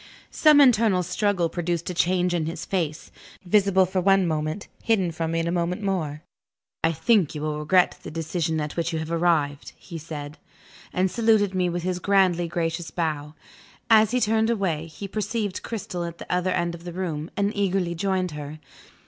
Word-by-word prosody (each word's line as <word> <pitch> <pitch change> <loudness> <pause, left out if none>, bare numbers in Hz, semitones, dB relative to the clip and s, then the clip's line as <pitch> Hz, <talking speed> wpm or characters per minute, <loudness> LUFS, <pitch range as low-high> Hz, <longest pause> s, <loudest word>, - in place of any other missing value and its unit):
Some 305 -2 +5
internal 225 -8 +5
struggle 180 0 0
produced 170 0 -3
a - - -5
change 180 +1 +1
in 165 -3 0
his 165 0 -5
face 160 -5 -3 0.3
visible 190 0 +4
for 185 +1 -1
one 195 0 +4
moment, 155 +3 -2
hidden 195 -7 +1
from 165 0 -3
me 165 - +1
in 165 - -2
a - - 0
moment 180 +3 -1
more. 160 -6 -2 0.6
"I 165 - +3
think 185 - +2
you 150 - -4
will 150 -1 -2
regret 180 +4 +2
the - - -8
decision 160 0 -2
at 150 -1 -4
which 170 0 -1
you 160 - -2
have 160 +1 -4
arrived." 160 -4 0
He 170 -3 -9
said 150 -2 -7
that, - - -22 0.5
and 185 0 +1
saluted 220 -4 +2
me 180 -1 +1
with 175 0 -3
his 180 0 -1
grandly 185 -3 +2
gracious 165 0 -2
bow. 155 -3 -3 0.6
As 220 -1 +7
he 250 +2 +1
turned 220 0 +2
away, 180 -8 -1
he 165 +5 -8
perceived 210 -1 -3
Cristel 185 -6 -5
at 170 0 -7
the - - -9
other 180 +1 +1
end 175 -1 0
of 170 0 -10
the 175 -1 -7
room, 165 -3 -3
and 200 +1 0
eagerly 190 -3 0
joined 185 0 -1
her. 150 0 -7
175 Hz, 190 wpm, -25 LUFS, 165-195 Hz, 0.6 s, As